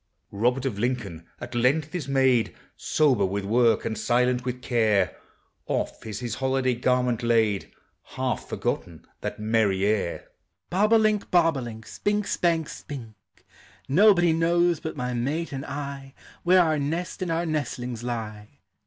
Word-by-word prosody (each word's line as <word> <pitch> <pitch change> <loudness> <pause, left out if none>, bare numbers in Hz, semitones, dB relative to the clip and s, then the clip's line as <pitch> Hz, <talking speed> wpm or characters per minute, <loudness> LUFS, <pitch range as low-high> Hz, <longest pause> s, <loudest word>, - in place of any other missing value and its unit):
Robert 125 +6 0
of 110 -7 -2
Lincoln 105 -9 -3
at 120 +1 -8
length 135 +6 +1
is 165 -7 -3
made 130 -4 +2 0.2
Sober 135 -9 +2
with 100 +1 -1
work, 115 +1 +3
and 115 -1 -2
silent 125 +1 +1
with 125 0 -3
care; 110 -6 +2 0.5
Off - - -3
is 105 0 -5
his 120 -2 -3
holiday 130 0 0
garment 125 0 +1
laid, 115 -4 +1 0.4
Half - - -2
forgotten 85 -3 -3
that - - -5
merry 105 -3 +1
air, 105 -5 -1 0.4
Bob 205 +4 +2
o' - - +8
link, 215 -2 +1
bob 165 -3 +4
o' - - -3
link, 115 -2 -8
Spink, 205 0 -1
spank, 165 -4 +1
spink; 125 -7 -8 0.7
Nobody 175 +1 +5
knows 170 0 +2
but 160 - -6
my 125 -1 -2
mate 145 +8 -2
and 135 0 -5
I 140 -1 -6 0.3
Where 180 +1 +5
our 155 -2 +1
nest 165 +7 -3
and 185 - -2
our 165 +1 0
nestlings 125 -7 -3
lie. 110 -3 -5
125 Hz, 155 wpm, -25 LUFS, 115-160 Hz, 0.7 s, o